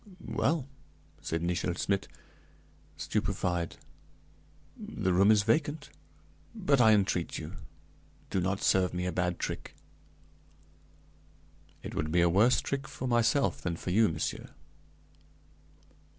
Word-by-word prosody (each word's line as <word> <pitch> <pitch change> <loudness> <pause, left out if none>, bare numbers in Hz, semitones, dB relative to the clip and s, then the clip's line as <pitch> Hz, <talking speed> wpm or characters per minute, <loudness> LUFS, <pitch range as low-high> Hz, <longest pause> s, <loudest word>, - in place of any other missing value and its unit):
"Well," 155 -5 0 0.5
said 80 0 -3
Nichel 85 0 -1
Schmidt, 100 +2 -1 0.9
stupefied, 85 -2 -2 1.0
"the 95 - -2
room 100 +3 +5
is 105 -2 +5
vacant, 145 +6 0 0.6
but 140 -3 +2
I 110 -2 +7
entreat 100 -2 +1
you, - - -7 0.8
do 95 - +1
not 95 +2 -1
serve 90 -1 +2
me 90 0 -2
a 90 - -1
bad 90 0 -1
trick." - - -5 2.1
"It - - -6
would 75 +1 -2
be 85 +1 +3
a 85 - +4
worse 110 +8 +4
trick 135 -1 -3
for 135 -2 -5
myself 120 +3 +2
than 85 -2 -2
for 90 - -5
you, 110 +3 +4
monsieur." 80 - -4
95 Hz, 120 wpm, -30 LUFS, 90-120 Hz, 2.1 s, I